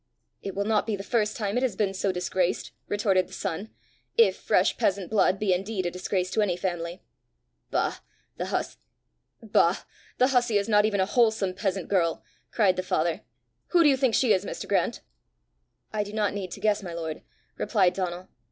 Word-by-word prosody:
"It 195 Hz, -, -6 dB
will 200 Hz, +1 st, -1 dB
not 215 Hz, 0 st, +1 dB
be 220 Hz, -, 0 dB
the 195 Hz, -, -7 dB
first 210 Hz, 0 st, 0 dB
time 205 Hz, 0 st, -1 dB
it -, -, +1 dB
has 255 Hz, -7 st, 0 dB
been 195 Hz, -1 st, 0 dB
so 195 Hz, 0 st, 0 dB
disgraced!" 180 Hz, 0 st, -1 dB, 0.2 s
retorted 195 Hz, -3 st, +1 dB
the -, -, -15 dB
son, 195 Hz, +7 st, -4 dB, 0.2 s
" -, -, -38 dB
if 460 Hz, -, +5 dB
fresh -, -, +2 dB
peasant 195 Hz, -1 st, 0 dB
blood 200 Hz, -3 st, +3 dB
be 195 Hz, -2 st, +1 dB
indeed 190 Hz, +1 st, -2 dB
a 175 Hz, -, -1 dB
disgrace 185 Hz, 0 st, -2 dB
to 220 Hz, -, +1 dB
any 185 Hz, -4 st, +1 dB
family!" 175 Hz, -1 st, -4 dB, 0.7 s
"Bah! -, -, 0 dB, 0.4 s
the -, -, -4 dB, 1.7 s
hussey 245 Hz, -4 st, +3 dB
is 200 Hz, -, -1 dB
not 210 Hz, -1 st, +4 dB
even 205 Hz, -2 st, 0 dB
a -, -, +3 dB
wholesome 220 Hz, -3 st, +2 dB
peasant 190 Hz, -1 st, -2 dB
girl!" 170 Hz, -4 st, +1 dB, 0.3 s
cried 200 Hz, -5 st, +2 dB
the -, -, +1 dB
father. 175 Hz, -3 st, 0 dB, 0.5 s
"Who 345 Hz, -1 st, +4 dB
do 300 Hz, -, +6 dB
you 275 Hz, -, +4 dB
think 260 Hz, -3 st, +2 dB
she 245 Hz, -5 st, +4 dB
is, 190 Hz, -, +1 dB
Mr. -, -, -6 dB
Grant?" -, -, 0 dB, 0.9 s
"I 210 Hz, -1 st, 0 dB
do 205 Hz, 0 st, -9 dB
not 210 Hz, -3 st, 0 dB
need 195 Hz, -2 st, -4 dB
to -, -, -8 dB
guess, 210 Hz, 0 st, +1 dB
my 175 Hz, -3 st, -6 dB
lord," 160 Hz, -2 st, -5 dB, 0.4 s
replied 190 Hz, -6 st, +2 dB
Donal. 180 Hz, -1 st, -4 dB
200 Hz, 190 wpm, -27 LUFS, 185-215 Hz, 1.7 s, do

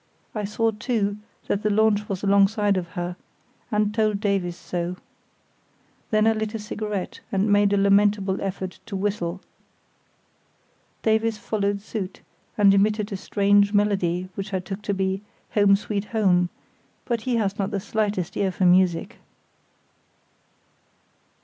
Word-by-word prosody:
I 210 Hz, -2 st, -2 dB
saw, 225 Hz, +2 st, 0 dB
too, 210 Hz, -2 st, -1 dB, 0.3 s
that 205 Hz, -, -1 dB
the 215 Hz, -, +1 dB
launch 210 Hz, 0 st, +2 dB
was 195 Hz, -1 st, -3 dB
alongside 200 Hz, +1 st, +3 dB
of 180 Hz, -2 st, -2 dB
her, 175 Hz, 0 st, -3 dB, 0.6 s
and 210 Hz, -1 st, +1 dB
told 215 Hz, -2 st, +1 dB
Davies 195 Hz, -4 st, 0 dB
so. 175 Hz, 0 st, -4 dB, 1.1 s
Then 215 Hz, 0 st, +3 dB
I 225 Hz, -, +5 dB
lit 220 Hz, 0 st, -3 dB
a -, -, 0 dB
cigarette, 210 Hz, -2 st, -4 dB
and 200 Hz, +2 st, +1 dB
made 205 Hz, 0 st, +4 dB
a 200 Hz, -, +3 dB
lamentable 200 Hz, -1 st, +3 dB
effort 190 Hz, -1 st, -4 dB
to 200 Hz, -, -5 dB
whistle. 190 Hz, -2 st, -2 dB, 1.6 s
Davies 220 Hz, 0 st, +2 dB
followed 205 Hz, -2 st, -1 dB
suit, 200 Hz, -3 st, -5 dB, 0.4 s
and 200 Hz, -2 st, +6 dB
emitted 210 Hz, +2 st, +2 dB
a -, -, -2 dB
strange 200 Hz, +1 st, +2 dB
melody 185 Hz, -3 st, +1 dB
which 195 Hz, +1 st, -4 dB
I -, -, +1 dB
took 190 Hz, +3 st, -6 dB
to 210 Hz, -1 st, -2 dB
be 190 Hz, 0 st, -1 dB, 0.3 s
"Home, 205 Hz, -2 st, +5 dB
Sweet 205 Hz, 0 st, -3 dB
Home," 185 Hz, -6 st, +2 dB, 0.6 s
but 235 Hz, -3 st, -1 dB
he 245 Hz, +1 st, -1 dB
has 205 Hz, -3 st, -1 dB
not 195 Hz, 0 st, 0 dB
the 200 Hz, -2 st, -2 dB
slightest 205 Hz, -3 st, -2 dB
ear 195 Hz, -2 st, +1 dB
for 185 Hz, +1 st, 0 dB
music. 180 Hz, -2 st, +3 dB
200 Hz, 145 wpm, -24 LUFS, 190-210 Hz, 1.6 s, and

